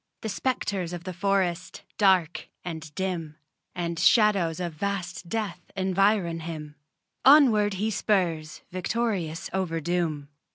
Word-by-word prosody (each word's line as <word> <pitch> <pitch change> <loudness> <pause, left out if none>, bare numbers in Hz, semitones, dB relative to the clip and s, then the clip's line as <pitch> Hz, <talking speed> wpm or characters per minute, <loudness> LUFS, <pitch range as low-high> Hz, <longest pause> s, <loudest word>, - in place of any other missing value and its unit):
The 220 - -3
spectres 200 -6 -2
of 175 -1 -6
the 185 0 -5
forest, 185 -2 -1 0.2
dark 185 -5 +3 0.2
and 160 -3 -6
dim, 175 -5 -3 0.4
And 170 -1 -3
shadows 200 -8 +4
of 175 -2 -3
vast 185 0 -4
death 215 -4 -3
environ 190 -2 +2
him 155 -2 -7 0.5
Onward 235 -8 +6
he 215 +4 -1
spurs 175 -8 0
victorious 185 -3 -2
over 180 -4 -1
doom. 160 -3 -2
180 Hz, 120 wpm, -26 LUFS, 165-200 Hz, 0.5 s, Onward